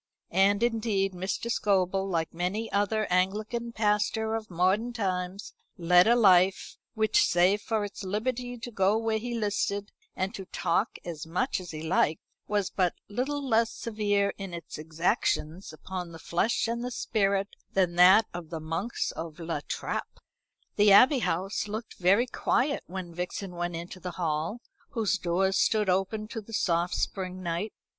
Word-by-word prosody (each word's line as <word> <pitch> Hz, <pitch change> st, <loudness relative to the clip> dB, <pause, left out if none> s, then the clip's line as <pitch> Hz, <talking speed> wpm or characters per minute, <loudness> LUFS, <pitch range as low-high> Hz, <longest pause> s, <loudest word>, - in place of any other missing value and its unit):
And 200 Hz, +4 st, +4 dB
indeed 215 Hz, -5 st, +1 dB
Mr. 190 Hz, +6 st, -3 dB
Scobel, 195 Hz, -2 st, +1 dB
like 165 Hz, -3 st, -1 dB
many 185 Hz, +6 st, -2 dB
another 215 Hz, +2 st, +1 dB
Anglican 215 Hz, +6 st, 0 dB
pastor 215 Hz, 0 st, 0 dB
of 225 Hz, -1 st, -3 dB
modern 190 Hz, +7 st, +1 dB
times, 185 Hz, -3 st, -3 dB, 0.2 s
led 180 Hz, +1 st, +5 dB
a 235 Hz, -, +6 dB
life 190 Hz, -4 st, +4 dB, 0.2 s
which, 220 Hz, -1 st, +3 dB
save 185 Hz, +4 st, +3 dB
for 220 Hz, -2 st, -1 dB
its 205 Hz, 0 st, -8 dB
liberty 245 Hz, +5 st, -2 dB
to 240 Hz, +1 st, -7 dB
go 200 Hz, 0 st, +2 dB
where 225 Hz, -1 st, 0 dB
he 240 Hz, +1 st, -4 dB
listed, 205 Hz, -1 st, -1 dB, 0.2 s
and 190 Hz, +3 st, -2 dB
to 195 Hz, -4 st, -7 dB
talk 185 Hz, +4 st, -1 dB
as 165 Hz, -2 st, -6 dB
much 190 Hz, +8 st, -1 dB
as 180 Hz, -2 st, -9 dB
he 155 Hz, 0 st, -6 dB
liked, 160 Hz, -2 st, +2 dB, 0.3 s
was 205 Hz, -2 st, 0 dB
but 180 Hz, -3 st, +1 dB
little 270 Hz, +6 st, -2 dB
less 230 Hz, -1 st, +3 dB
severe 205 Hz, -4 st, 0 dB
in 195 Hz, -3 st, -5 dB
its 170 Hz, -2 st, -8 dB
exactions 165 Hz, +1 st, -1 dB
upon 180 Hz, +2 st, -6 dB
the -, -, -8 dB
flesh 175 Hz, +9 st, 0 dB
and 235 Hz, +1 st, -2 dB
the 250 Hz, -, -2 dB
spirit 200 Hz, -4 st, 0 dB, 0.2 s
than 185 Hz, -3 st, +2 dB
that 185 Hz, +5 st, +7 dB
of 170 Hz, -2 st, -7 dB
the 165 Hz, -1 st, -4 dB
monks 165 Hz, +9 st, -2 dB
of 160 Hz, -1 st, -7 dB
La 165 Hz, -2 st, -3 dB
Trappe. -, -, -4 dB, 0.6 s
The 205 Hz, 0 st, +6 dB
Abbey 255 Hz, +7 st, +7 dB
House 195 Hz, 0 st, -1 dB
looked 215 Hz, +2 st, -6 dB
very 195 Hz, +7 st, +4 dB
quiet 275 Hz, +2 st, 0 dB
when 180 Hz, -1 st, -6 dB
Vixen 180 Hz, +2 st, -4 dB
went 175 Hz, -1 st, -3 dB
into 170 Hz, +2 st, -7 dB
the 180 Hz, 0 st, -6 dB
hall, 165 Hz, +6 st, -2 dB, 0.3 s
whose 215 Hz, -4 st, +1 dB
doors 190 Hz, +3 st, +1 dB
stood 210 Hz, -3 st, +2 dB
open 195 Hz, +3 st, -1 dB
to 230 Hz, -1 st, -5 dB
the 225 Hz, +2 st, -13 dB
soft 175 Hz, -4 st, +1 dB
spring 185 Hz, -1 st, -3 dB
night. 175 Hz, +5 st, -2 dB
195 Hz, 165 wpm, -28 LUFS, 180-220 Hz, 0.6 s, that